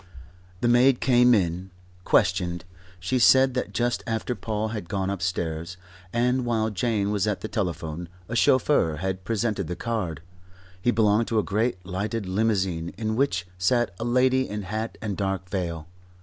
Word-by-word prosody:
The 120 - +2
maid 120 +2 +5
came 125 -1 +5
in. 90 -1 -1 0.4
Questioned, 90 -3 +1 0.3
she 125 +8 0
said 130 +2 +6
that 125 - -2
just 120 0 0
after 115 +2 -1
Paul 110 0 -3
had 105 -6 -6
gone 95 -2 -1
upstairs, 85 -2 -3 0.3
and 125 +2 +1
while 110 -2 0
Jane 105 0 0
was 105 0 0
at 105 -2 -1
the - - -4
telephone, 85 -5 -3 0.2
a 115 - -4
chauffeur 115 - +3
had 95 +3 -3
presented 110 -3 -1
the 90 - -3
card. 90 -7 -3 0.6
He 120 - +1
belonged 110 -1 +3
to 115 - 0
a 105 - +3
great 105 -3 -1
lighted 100 +4 -3
limousine 95 -4 0
in 110 -1 -2
which 110 -9 0
sat 120 +2 +2
a - - -3
lady 130 +2 +2
in 105 0 -4
hat 110 +4 -4
and 105 -3 -2
dark 95 -2 -2
veil. 85 -5 -3
105 Hz, 165 wpm, -25 LUFS, 90-120 Hz, 0.6 s, said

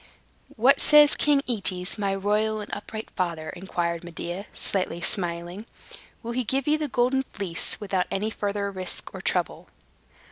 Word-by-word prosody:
"What 250 +5 +4
says 300 -1 +7
King 290 -2 +3
Aetes, 190 -5 0
my 195 -1 0
royal 210 +2 0
and 210 - -7
upright 220 +2 -6
father?" 170 -4 -2
inquired 175 -2 -3
Medea, 175 +3 -6
slightly 185 -3 +1
smiling. 175 +2 -2 0.6
"Will 235 - -4
he 250 +1 -1
give 265 +4 -1
you 305 +1 +3
the 305 - -1
Golden 255 +1 +2
Fleece, 195 -9 -3
without 195 -3 -1
any 210 +3 -1
further 200 -1 -2
risk 185 -2 -5
or - - -7
trouble?" - - -1
200 Hz, 150 wpm, -26 LUFS, 180-235 Hz, 0.6 s, says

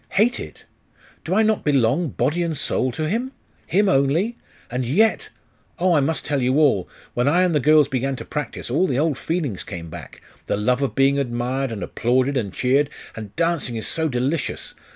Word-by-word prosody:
'Hate 235 +5 +2
it? - - -9 0.6
Do 180 - -1
I 220 - +4
not 215 -1 +1
belong, 140 +3 +2
body 165 +6 0
and 165 -3 -1
soul, 130 -1 0
to 155 +3 -2
him? 240 - -2 0.3
him 205 +3 +2
only?.... 155 - +2 0.4
And 125 +1 -1
yet.... 200 - +2 0.5
Oh, 180 0 +2
I 155 - +4
must 150 +3 -1
tell 145 -2 0
you 130 +2 +2
all! 135 - +3 0.2
When 120 +2 +1
I 175 +5 +4
and 180 -2 +2
the 150 - +3
girls 150 +1 +5
began 135 0 -1
to - - -8
practise, 150 -4 -5
all 170 +8 +2
the 130 - -1
old 150 -2 +1
feelings 155 - -2
came 85 -4 -8
back 80 -5 -10 0.3
the - - 0
love 125 +5 +1
of 130 -6 -1
being 135 +1 +3
admired, 125 +1 -2
and 105 -3 -4
applauded, 130 +3 +1
and 110 -7 -1
cheered; 135 +7 +2 0.3
and 105 -3 -8
dancing 165 -7 0
is 110 - -4
so 160 -1 0
delicious! 135 +5 -2
140 Hz, 195 wpm, -22 LUFS, 125-165 Hz, 0.6 s, girls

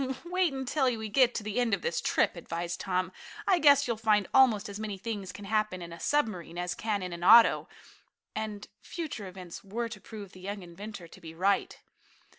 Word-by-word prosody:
"Wait 360 -1 +1
until 265 +1 -1
we 220 -1 -5
get 245 +2 +4
to 215 - -2
the 215 +3 -2
end 235 -4 +3
of - - -12
this 480 - -1
trip," - - +2
advised 170 +1 -4
Tom. 185 -1 -1 0.4
"I 370 -3 +4
guess 285 -2 +6
you'll 235 -2 -1
find 210 -3 +2
almost 230 -6 +5
as 200 0 -7
many 210 -2 -4
things 200 -2 -5
can 205 - -10
happen 215 -2 0
in 170 -1 -8
a 170 - -10
submarine 185 - -1
as 175 0 -2
can 210 -2 -2
in 180 -1 -4
an 170 0 -6
auto," 230 +5 +7 0.7
and 215 -1 -4 0.2
future 305 - -5
events 180 -2 -9
were 230 +4 -3
to 210 -3 -9
prove 205 -2 -9
the 185 - -14
young 200 +1 -5
inventor 180 +1 -9
to 190 - -15
be 165 -1 -10
right. 195 +4 +1
205 Hz, 205 wpm, -29 LUFS, 185-235 Hz, 0.7 s, auto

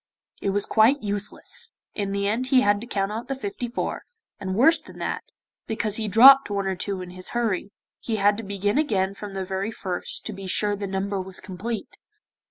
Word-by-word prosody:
It 200 - 0
was 200 +1 +2
quite 235 +5 +4
useless, 205 0 -3 0.2
in 200 -2 -2
the 200 0 0
end 235 +5 0
he 260 -1 +5
had 205 -3 +3
to 240 - -7
count 200 -3 -1
out 225 +3 -5
the 270 - -2
fifty 245 0 -4
four, 240 - -3 0.4
and 190 -2 -3
worse 315 - +5
than - - -14
that, - - -2 0.5
because 215 -2 -1
he 220 -1 -2
dropped 265 +6 +8
one 200 -1 -1
or 190 0 0
two 195 0 -3
in 180 - -9
his 185 0 -6
hurry, 210 -4 -1 0.3
he 225 - -2
had 205 0 +4
to 225 - -5
begin 200 +5 0
again 195 -10 +1
from 200 0 -8
the 190 -1 -2
very 190 +2 -2
first, 185 -5 -4
to 215 - -4
be 195 -1 -8
sure 205 +2 +1
the 200 0 -4
number 195 0 -2
was 185 0 -7
complete. 215 +4 -6
205 Hz, 210 wpm, -25 LUFS, 195-225 Hz, 0.5 s, dropped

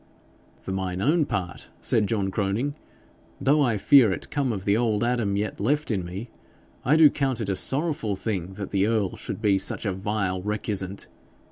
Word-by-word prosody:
'For - - -7
mine 95 -1 -2
own 150 - +2
part,' 90 -6 -4
said 105 -3 +1
John 100 -3 -1
Croning, 105 +8 -1 0.7
'though 145 +3 +3
I 120 -6 +2
fear 125 0 +6
it 95 - -5
come 140 -4 0
of 95 -3 -4
the 100 - +3
old 110 -2 +1
Adam 120 -5 0
yet 105 0 -3
left 145 +7 0
in 95 -4 0
me, 95 +7 -7 0.5
I 140 +6 +4
do 160 -1 +8
count 135 -3 0
it 110 -3 -3
a 95 - +1
sorrowful 135 - -1
thing 95 -2 -3
that 100 0 -6
the 100 0 +2
earl 110 -4 0
should 110 - -6
be 100 -2 +3
such 95 - -2
a 100 - 0
vile 95 -1 -2
recusant. 100 -1 -3
105 Hz, 190 wpm, -25 LUFS, 95-125 Hz, 0.7 s, do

